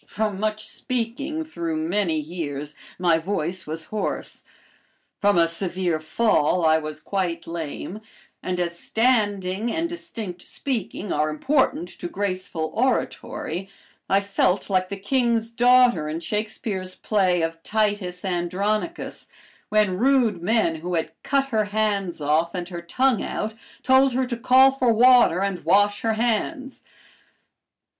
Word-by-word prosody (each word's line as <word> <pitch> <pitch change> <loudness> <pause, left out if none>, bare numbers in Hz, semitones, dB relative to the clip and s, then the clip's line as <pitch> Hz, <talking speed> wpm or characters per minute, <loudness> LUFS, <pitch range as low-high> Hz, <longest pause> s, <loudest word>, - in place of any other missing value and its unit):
From 210 -2 -2
much 215 0 -2
speaking 255 +6 -3
through 170 - -4
many 165 +1 0
years 150 -2 -5 0.2
my 170 -2 +3
voice 175 -1 -2
was 160 +1 -3
hoarse, 215 - -3 0.8
from 205 -2 +3
a 170 -1 +5
severe 175 -1 -1
fall 165 -1 +2
I 160 0 +5
was 155 -1 -6
quite 175 0 -2
lame, 170 +5 -6 0.4
and 180 -1 -2
as 170 -1 -2
standing, 210 -3 +1
and 330 +1 -1
distinct 220 - -7
speaking 225 -6 -3
are 150 +1 +1
important 180 - +1
to 175 - -7
graceful 185 -4 -3
oratory, 195 -7 -2 0.4
I 195 +1 +4
felt 200 0 0
like 185 -1 +1
the 200 - -4
king's 230 +1 0
daughter 245 -8 +4
in 160 +2 -3
Shakespeare's 205 -1 -3
play 185 -5 +1
of 165 0 -3
"Titus 205 -3 -1
Andronicus," 195 - -2 0.4
when 210 -3 +2
rude 245 -7 +3
men 185 -4 +1
who 175 +3 -3
had 160 -1 -1
cut 275 0 0
her 220 -4 +1
hands 205 -4 -1
off 155 +4 +1
and 175 -1 -3
her 175 -2 -6
tongue 255 +7 +1
out, 220 +1 -3 0.3
told 265 0 +5
her 260 +1 +1
to 245 -1 -3
call 260 +3 +6
for 260 -3 +2
water 240 -5 +6
and 195 -2 -2
wash 205 +1 +3
her 225 -1 +1
hands. 245 +5 -1
200 Hz, 135 wpm, -24 LUFS, 170-230 Hz, 0.8 s, call